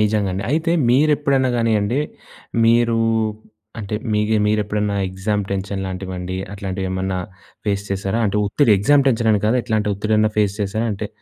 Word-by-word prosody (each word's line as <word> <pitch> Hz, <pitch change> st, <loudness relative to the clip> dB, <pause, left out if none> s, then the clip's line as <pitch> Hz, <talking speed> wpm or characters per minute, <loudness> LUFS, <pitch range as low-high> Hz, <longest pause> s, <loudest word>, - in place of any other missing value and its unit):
నిజంగండి. 100 Hz, -3 st, 0 dB
అయితే 160 Hz, +3 st, +1 dB, 0.2 s
మీరెప్పుడన్నా 140 Hz, -1 st, +3 dB
గానియ్యండి, 115 Hz, +2 st, +1 dB, 0.6 s
మీరు 115 Hz, 0 st, +3 dB, 0.8 s
అంటే 105 Hz, 0 st, -4 dB, 0.2 s
మీకు 105 Hz, +1 st, +1 dB
మీరెప్పుడన్నా 105 Hz, -1 st, 0 dB
ఎగ్జామ్ 100 Hz, +2 st, -2 dB
టెన్షన్ 100 Hz, 0 st, -3 dB
లాంటివండి 95 Hz, -1 st, -5 dB, 0.2 s
అట్లాంటివి 95 Hz, -1 st, -4 dB
ఏమన్నా 95 Hz, 0 st, -2 dB, 0.5 s
ఫేస్ 100 Hz, -1 st, 0 dB
చేసారా? 100 Hz, +3 st, -1 dB
అంటే 100 Hz, -, -1 dB
ఒత్తిడి 115 Hz, +3 st, +3 dB
ఎగ్జామ్ 140 Hz, +7 st, +4 dB
టెన్షన్ 115 Hz, -2 st, +2 dB
అని 105 Hz, -1 st, +1 dB
కాదు. 120 Hz, +4 st, +3 dB
ఎట్లాంటి 110 Hz, -3 st, 0 dB
ఒత్తిడైనా 110 Hz, +1 st, +1 dB
ఫేస్ 100 Hz, -2 st, +2 dB
చేసారా? 110 Hz, +4 st, -1 dB
అంటే 100 Hz, +1 st, -5 dB
105 Hz, 140 wpm, -20 LUFS, 100-115 Hz, 0.8 s, ఎగ్జామ్